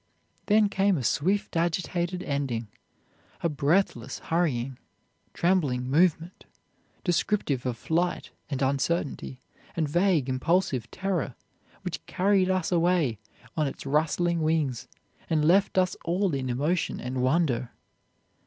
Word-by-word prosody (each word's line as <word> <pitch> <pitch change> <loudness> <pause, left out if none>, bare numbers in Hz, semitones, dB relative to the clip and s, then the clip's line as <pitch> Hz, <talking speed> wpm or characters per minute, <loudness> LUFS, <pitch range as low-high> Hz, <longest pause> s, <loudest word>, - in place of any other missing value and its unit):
Then 210 0 +5
came 200 -2 +2
a 130 - -3
swift 195 - 0
agitated 175 +1 -1
ending 130 -6 -2 0.7
a 170 - +2
breathless, 140 - 0
hurrying, 135 -7 -1 0.5
trembling 145 -9 +1
movement, 170 +2 +1 0.6
descriptive 175 - 0
of 120 -2 -2
flight, 170 +7 -1 0.2
and 135 -2 -1
uncertainty, 135 -1 -1 0.3
and 160 -2 0
vague 170 -2 +2
impulsive 130 - 0
terror, 185 -9 -2 0.5
which 180 -3 -4
carried 190 0 +2
us 185 -2 0
away 170 - +2 0.4
on 155 -2 +1
its 135 - -7
rustling 160 +4 +1
wings, 155 -6 0 0.4
and 155 -2 +2
left 190 +4 +3
us 185 0 +3
all 180 +1 0
in 130 -2 -2
emotion 150 +8 0
and 125 +1 -3
wonder. 130 -3 +1
160 Hz, 115 wpm, -27 LUFS, 135-180 Hz, 0.7 s, Then